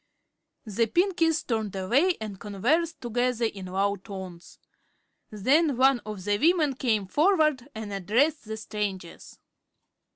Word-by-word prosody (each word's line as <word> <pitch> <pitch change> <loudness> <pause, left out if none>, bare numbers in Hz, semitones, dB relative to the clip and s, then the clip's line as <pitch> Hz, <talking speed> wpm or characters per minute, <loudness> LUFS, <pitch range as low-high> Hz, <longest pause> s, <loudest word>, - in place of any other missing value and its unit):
The 225 +2 0
Pinkies 340 - +1
turned 220 -5 -2
away 265 - +2
and 210 -3 -7
conversed 275 - 0
together 245 0 0
in 195 -4 -4
low 200 +2 0
tones. 190 -3 -10 0.7
Then 270 - +2
one 265 0 +4
of 210 -3 -6
the 205 +1 0
women 315 -2 +3
came 225 -6 0
forward 305 - +2
and 215 -2 -6
addressed 235 - +1
the 220 0 -5
strangers. 205 -5 -5
225 Hz, 125 wpm, -26 LUFS, 200-295 Hz, 0.7 s, one